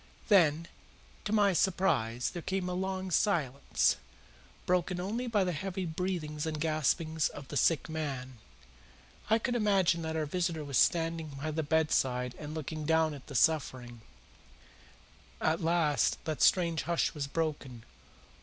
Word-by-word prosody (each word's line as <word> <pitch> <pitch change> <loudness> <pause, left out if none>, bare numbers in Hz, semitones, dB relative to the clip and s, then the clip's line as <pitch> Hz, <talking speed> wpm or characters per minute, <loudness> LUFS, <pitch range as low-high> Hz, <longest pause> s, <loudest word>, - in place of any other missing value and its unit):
Then, 170 -5 +4 0.6
to 210 - -2
my 205 -3 +4
surprise, 140 -10 +1
there 175 - -6
came 190 +1 -2
a 180 - -2
long 190 0 -3
silence, 155 - +1 0.7
broken 180 0 0
only 225 +7 -3
by 210 -4 +2
the 180 - 0
heavy 185 +3 -4
breathings 160 -3 -3
and 155 -1 -3
gaspings 155 0 0
of 135 -2 -10
the - - -6
sick 155 +1 +2
man. 135 -6 -5 0.9
I 220 - +5
could 240 +2 -2
imagine 195 -7 +2
that 160 0 -3
our 155 -1 0
visitor 170 0 -2
was 140 -3 +1
standing 165 -3 +1
by 155 +2 -3
the 160 +1 -1
bedside 135 -5 +1
and 150 +1 -7
looking 155 0 -5
down 160 0 +2
at 140 -3 -11
the 140 - -9
sufferer. 130 -4 +1 1.5
At 160 +1 +1
last 165 -3 +2
that 155 -4 -3
strange 170 -4 +3
hush 170 - +1
was 145 -3 -3
broken. 140 -6 -3
160 Hz, 145 wpm, -31 LUFS, 150-180 Hz, 1.5 s, I